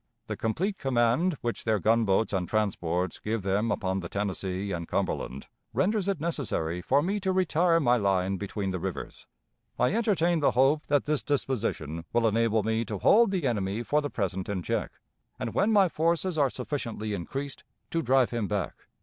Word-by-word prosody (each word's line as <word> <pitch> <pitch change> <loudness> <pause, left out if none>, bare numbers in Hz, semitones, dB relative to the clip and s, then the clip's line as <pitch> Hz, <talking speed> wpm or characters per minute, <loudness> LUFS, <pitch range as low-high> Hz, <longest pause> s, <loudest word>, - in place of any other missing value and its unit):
The - - -4
complete 185 - -1
command 135 +6 +2
which 120 -1 -3
their 110 -1 +2
gunboats 110 0 +2
and 90 -2 -1
transports 90 -5 -1
give 110 -1 -2
them 100 +4 +1
upon 95 -1 -1
the 85 -2 -6
Tennessee 100 -1 -2
and 85 -2 -3
Cumberland 65 +2 -2 0.3
renders 200 +1 +1
it 195 -5 0
necessary 105 - -2
for 140 +10 +2
me 200 +3 0
to 190 -1 0
retire 175 -2 +3
my 125 -5 +3
line 95 -2 +1
between 100 0 -3
the 90 - -3
rivers. - - -6 0.5
I 125 - +2
entertain 185 -7 +2
the 145 - +2
hope 140 +4 +3
that 145 -1 +3
this 150 -1 0
disposition 90 - -2
will 115 -1 +3
enable 110 0 +2
me 110 +1 0
to 105 0 -4
hold 225 - +5
the 185 -6 -1
enemy 105 -2 -1
for 150 +5 +1
the 145 - -3
present 95 -5 -3
in 95 -3 -2
check, - - -2 0.4
and, - - -4
when 215 - +2
my 200 -3 +5
forces 170 +2 0
are 145 -3 +3
sufficiently 120 -5 -4
increased, 135 +10 -5 0.3
to 165 - +1
drive 130 -4 +3
him 115 -4 -1
back." 100 -4 -4
115 Hz, 180 wpm, -28 LUFS, 100-155 Hz, 0.5 s, hold